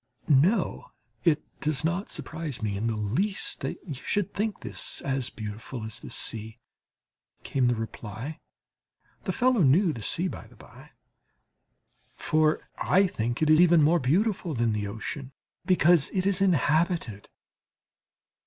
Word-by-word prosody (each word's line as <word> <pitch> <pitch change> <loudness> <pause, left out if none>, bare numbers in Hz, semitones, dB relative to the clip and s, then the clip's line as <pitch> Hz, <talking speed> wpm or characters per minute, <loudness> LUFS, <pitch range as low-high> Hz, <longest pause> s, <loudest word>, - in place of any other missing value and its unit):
"No, 165 - +2 0.4
it 160 -4 +3 0.2
does 150 0 -1
not 175 +5 -1
surprise 155 -7 -4
me 105 -2 -1
in 105 +4 -1
the 115 - -1
least 125 - 0
that - - -4
you 155 - -4
should 200 +8 -2
think 210 0 -2
this - - -4
as 135 -3 -1
beautiful 110 +3 -7
as 110 0 -6
the - - -10
sea," 110 0 -2 0.9
came 130 -2 +1
the 120 - +2
reply 115 +6 -6 0.9
(the - - 0
fellow 250 -3 +2
knew 160 +4 +4
the 115 - -7
sea, 170 - +1
by - - -7
the - - -19
bye); - - -15 1.3
"for 155 0 +1
I 195 +2 +4
think 120 - -2
it 155 - +2
even 165 0 +6
more 165 +4 +4
beautiful 175 - 0
than 115 -2 +1
the 105 -1 -2
ocean, 130 +6 -6 0.3
because 175 -4 +4
it 185 -1 +1
is 195 -1 +1
inhabited." 160 - +1
150 Hz, 145 wpm, -27 LUFS, 115-180 Hz, 1.3 s, even